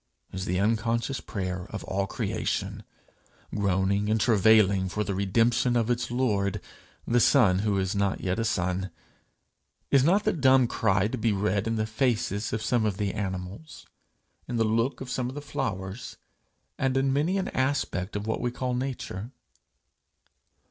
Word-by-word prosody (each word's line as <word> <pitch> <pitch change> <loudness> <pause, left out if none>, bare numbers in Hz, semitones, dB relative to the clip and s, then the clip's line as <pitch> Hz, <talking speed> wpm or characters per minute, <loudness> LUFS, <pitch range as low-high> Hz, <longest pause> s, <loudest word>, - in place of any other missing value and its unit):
is 95 0 -4
the 90 0 0
unconscious 115 +5 0
prayer 90 -2 -4
of - - -6
all 100 +1 -1
creation, - - -2 0.7
groaning 100 0 +1
and 110 +1 +2
travailing 105 -4 +4
for 105 +3 -1
the 100 - -3
redemption 115 +5 +2
of 120 0 +2
its 120 0 -1
lord, 105 -6 0 0.5
the 120 - +2
son 110 -8 +5
who 100 -1 +1
is 95 0 0
not 100 -1 0
yet 95 +3 -1
a - - +1
son. 95 -3 -1 1.0
Is 135 -2 +5
not 190 +8 +3
the - - +1
dumb 130 -4 +5
cry 95 -3 +1
to 125 +2 -4
be 110 +1 +2
read 100 +1 0
in 115 - 0
the 110 -1 0
faces 110 -2 -1
of 110 0 -2
some 115 +1 +1
of 105 -3 0
the 100 -2 -1
animals, 95 +7 -6 0.6
in 120 - -4
the 115 - +2
look 115 +5 0
of 130 - -6
some 125 -1 -1
of 130 - -8
the - - -4
flowers, 95 -6 -4 0.6
and 135 -1 +1
in 135 0 +2
many 160 +7 +1
an 190 - -1
aspect 130 -8 -1
of 105 0 -3
what 110 - -2
we 120 - 0
call 125 +1 -3
Nature? 125 -5 -4
110 Hz, 170 wpm, -27 LUFS, 95-125 Hz, 1.0 s, son